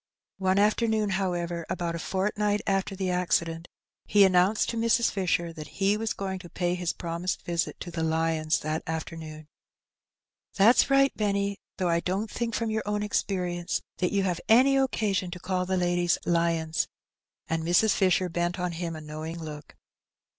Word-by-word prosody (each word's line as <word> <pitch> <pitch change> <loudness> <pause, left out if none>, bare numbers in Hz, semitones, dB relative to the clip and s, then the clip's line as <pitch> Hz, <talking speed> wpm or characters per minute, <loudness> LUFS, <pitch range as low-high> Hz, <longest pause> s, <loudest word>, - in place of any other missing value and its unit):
One 190 0 +2
afternoon, 215 0 +2
however, 175 -3 -1
about 175 -2 -2
a 170 - -4
fortnight 205 +3 0
after 195 0 0
the 190 -1 -2
acci 180 -1 +2
dent, 165 +1 -7 0.4
he 205 -1 +6
announced 190 +2 +3
to 235 - -3
Mrs. 230 +1 +3
Fisher 175 -3 0
that 155 -2 -10
he 195 +1 +3
was 225 +1 -2
going 190 -1 -4
to 175 -1 -11
pay 175 0 -1
his 180 -1 -1
promised 170 +2 -3
visit 170 0 -2
to 175 - -6
the 165 -1 -3
lions 160 -1 +1
that 155 +1 -2
afternoon. 160 -1 -6 1.1
'^That's 220 +8 +5
right, 275 0 +4
Benny; 200 -1 -1 0.2
though 180 -2 0
I 170 0 +3
don't 195 +5 -2
think 235 0 -2
from 230 -1 -1
your 220 0 0
own 210 0 -1
experience 180 -4 -1
that 180 - 0
you 200 -1 +1
have 180 -3 -1
any 260 +5 +6
occasion 215 -8 +1
to 180 - -7
call 180 0 -2
the 190 0 0
ladies 175 -1 +2
lions,'' 165 -2 +1 0.6
and 165 0 -1
Mrs. 175 +6 +4
Fisher 185 -1 +2
bent 175 +1 -1
on 180 0 -1
him 165 0 -4
a 155 - -7
knowing 155 +2 -6
look. 150 -2 -8
180 Hz, 175 wpm, -27 LUFS, 170-200 Hz, 1.1 s, he